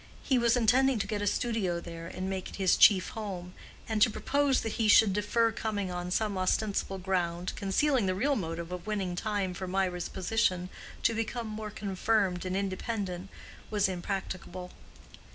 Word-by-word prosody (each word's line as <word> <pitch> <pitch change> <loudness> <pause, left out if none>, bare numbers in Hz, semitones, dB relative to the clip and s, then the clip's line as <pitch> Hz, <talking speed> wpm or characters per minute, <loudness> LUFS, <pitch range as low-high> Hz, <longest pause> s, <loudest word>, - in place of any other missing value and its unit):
He 260 -3 +2
was 235 +1 +3
intending 250 +3 +4
to 205 - -1
get 205 0 -3
a 205 - 0
studio 205 -6 0
there 165 -1 -8
and 185 +2 -5
make 190 -1 -3
it - - -9
his 190 -2 +3
chief 190 -4 +6
home; 185 -5 -6 0.3
and 220 -2 -1
to - - +7
propose 280 +4 +1
that 225 - -3
he 220 - +3
should 210 -1 +6
defer 225 +3 +2
coming 205 -4 -3
on 180 0 -4
some 200 +1 0
ostensible 195 +1 0
ground, 180 -2 -1
concealing 225 +4 +1
the 185 - +1
real 275 +9 +1
motive 170 -4 -4
of 180 +2 -6
winning 195 -4 -1
time 200 -1 -1
for 185 +1 -5
Mirah's 180 -1 -1
position 185 -2 0 0.3
to 230 - +3
become 225 +1 -3
more 215 0 -5
confirmed 195 -2 0
and 185 +1 -1
independent, 195 -1 -3 0.4
was 205 -2 +2
impracticable. 185 -1 -5
195 Hz, 170 wpm, -30 LUFS, 185-220 Hz, 0.4 s, to